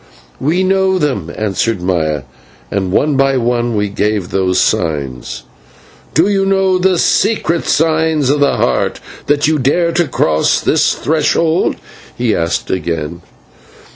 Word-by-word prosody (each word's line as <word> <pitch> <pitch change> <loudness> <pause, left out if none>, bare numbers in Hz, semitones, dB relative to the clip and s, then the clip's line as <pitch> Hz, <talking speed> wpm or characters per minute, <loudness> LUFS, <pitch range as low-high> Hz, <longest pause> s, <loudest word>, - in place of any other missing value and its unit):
"We 165 +7 +1
know 190 0 +2
them," 130 - -2
answered 110 0 -1
Maya. 80 -6 -1 0.5
And 95 -2 -1
one 145 +8 +1
by 135 0 +2
one 120 -1 0
we 105 0 0
gave 100 -2 -2
those 95 -1 0
signs. 70 -6 -1 0.7
"Do 165 +5 +4
you 200 -1 +1
know 190 -1 +2
the 185 0 +2
secret 170 -3 +1
signs 160 -3 +1
of 145 - +1
the 140 -1 +2
Heart, - - 0 0.3
that 145 0 +2
you 155 -1 +1
dare 170 +6 +1
to 170 0 +1
cross 80 - +1
this - - +1
threshold?" 160 +2 +1 0.4
he 120 -3 +1
asked 85 0 -2
again. 85 -2 -3
135 Hz, 140 wpm, -15 LUFS, -, 0.7 s, Do